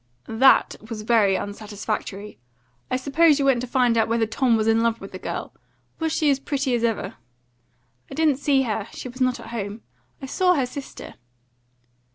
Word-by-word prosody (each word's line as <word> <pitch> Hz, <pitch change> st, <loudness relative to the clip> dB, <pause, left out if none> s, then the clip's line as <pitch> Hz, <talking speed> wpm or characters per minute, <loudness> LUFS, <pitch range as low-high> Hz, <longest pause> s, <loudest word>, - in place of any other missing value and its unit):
"That 250 Hz, +4 st, +4 dB
was 215 Hz, -2 st, -5 dB
very 210 Hz, -4 st, +3 dB
unsatisfactory. 205 Hz, 0 st, -5 dB, 0.5 s
I -, -, 0 dB
supposed 295 Hz, +3 st, +3 dB
you 280 Hz, -, 0 dB
went 265 Hz, -3 st, +3 dB
to 255 Hz, -, -4 dB
find 245 Hz, -1 st, +2 dB
out 225 Hz, -, +2 dB
whether 225 Hz, 0 st, +1 dB
Tom 230 Hz, +1 st, +2 dB
was 215 Hz, 0 st, 0 dB
in 225 Hz, 0 st, +3 dB
love 230 Hz, 0 st, +1 dB
with 195 Hz, -, -10 dB
the 185 Hz, -, -8 dB
girl. -, -, -5 dB, 0.5 s
Was 320 Hz, -1 st, -1 dB
she 305 Hz, -2 st, +2 dB
as 275 Hz, -, +1 dB
pretty 275 Hz, -2 st, -1 dB
as 235 Hz, -1 st, 0 dB
ever?" 225 Hz, -2 st, -1 dB, 0.9 s
"I -, -, -8 dB
didn't 310 Hz, -4 st, +2 dB
see 275 Hz, -1 st, +2 dB
her; 220 Hz, -3 st, -2 dB
she 255 Hz, -, -7 dB
was 255 Hz, +2 st, -10 dB
not 255 Hz, -1 st, +1 dB
at -, -, -10 dB
home; 215 Hz, -1 st, -5 dB, 0.4 s
I 275 Hz, -, -7 dB
saw 360 Hz, +6 st, +2 dB
her 270 Hz, -, +1 dB
sister." 270 Hz, +2 st, -9 dB
240 Hz, 190 wpm, -23 LUFS, 220-275 Hz, 0.9 s, That